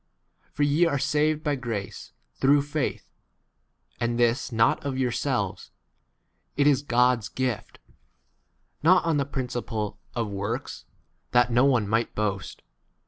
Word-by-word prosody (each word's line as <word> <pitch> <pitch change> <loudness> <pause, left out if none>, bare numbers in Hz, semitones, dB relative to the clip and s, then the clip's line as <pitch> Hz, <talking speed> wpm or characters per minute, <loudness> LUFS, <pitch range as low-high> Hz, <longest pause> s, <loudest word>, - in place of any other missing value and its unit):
For 145 - -1
ye 145 +4 +3
are 140 - 0
saved 150 +2 +1
by 150 - 0
grace, 115 -7 -5 0.2
through 140 - +3
faith; 145 -1 -3 0.9
and 120 0 -1
this 120 +3 +1
not 120 +7 +2
9 140 - -2
of - - -5
yourselves; 125 -5 -1 0.9
it 145 - +3
is 140 -2 +4
God's 125 -4 +2
gift: 130 -4 -3 1.0
not 180 +3 +5
on 165 -3 +2
the 140 - +1
principle 120 -6 -4 0.2
of 115 -2 -1
works, 100 +5 -4 0.5
that 120 -1 +4
10 - - -3
no 120 +3 +5
one 125 -7 +2
might 115 +3 0
boast. 100 -2 -3
125 Hz, 140 wpm, -26 LUFS, 115-145 Hz, 1.0 s, not